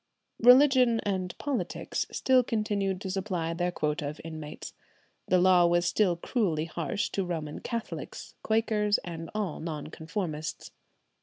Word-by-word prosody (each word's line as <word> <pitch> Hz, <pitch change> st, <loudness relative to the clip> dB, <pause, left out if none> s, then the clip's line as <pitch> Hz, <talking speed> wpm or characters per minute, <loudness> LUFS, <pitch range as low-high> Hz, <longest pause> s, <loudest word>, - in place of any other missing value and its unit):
Religion 250 Hz, -1 st, +6 dB
and 190 Hz, -3 st, -2 dB
politics 285 Hz, -4 st, -2 dB
still 260 Hz, -1 st, +4 dB
continued 205 Hz, -5 st, -1 dB
to 190 Hz, -1 st, -4 dB
supply 185 Hz, -4 st, -2 dB
their 175 Hz, +1 st, 0 dB
quota 150 Hz, -2 st, -1 dB
of 150 Hz, -, -9 dB
inmates. 155 Hz, -2 st, -7 dB, 0.5 s
The 185 Hz, -, +4 dB
law 180 Hz, -1 st, +5 dB
was 175 Hz, +1 st, +2 dB
still 180 Hz, -1 st, +2 dB
cruelly 170 Hz, -4 st, -1 dB
harsh 175 Hz, +6 st, -2 dB
to 195 Hz, -, -1 dB
Roman 160 Hz, -4 st, -4 dB
Catholics, 230 Hz, -1 st, -6 dB
Quakers, 215 Hz, -2 st, +2 dB
and 165 Hz, -2 st, -6 dB
all 205 Hz, -7 st, -2 dB
Non 155 Hz, -2 st, -5 dB
conformists. 160 Hz, -2 st, -5 dB
185 Hz, 135 wpm, -29 LUFS, 165-215 Hz, 0.5 s, Religion